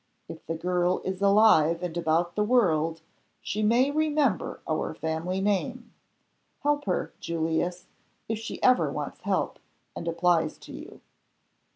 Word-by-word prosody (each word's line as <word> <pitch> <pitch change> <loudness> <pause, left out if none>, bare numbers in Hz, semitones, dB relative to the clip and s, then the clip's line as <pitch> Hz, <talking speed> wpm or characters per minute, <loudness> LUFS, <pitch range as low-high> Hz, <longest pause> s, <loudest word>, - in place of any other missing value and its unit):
If - - -10
the 165 - -2
girl 180 +2 0
is 190 0 -3
alive 195 -5 +5
and 175 -2 -4
about 170 +1 +1
the 210 - +2
world 165 -9 +2 0.4
she 210 - -3
may 240 +6 +3
remember 295 - 0
our 155 0 -2
family 160 +4 -2
name. 230 +4 -1 0.7
Help 290 0 +1
her, 185 - -2
Julius, 170 +2 -2 0.4
if 220 -1 -2
she 225 - -6
ever 255 0 +4
wants - - -5
help, - - -1 0.4
and 170 - -6
applies 170 -1 +1
to - - -12
you." - - -10
180 Hz, 140 wpm, -27 LUFS, 165-220 Hz, 0.7 s, alive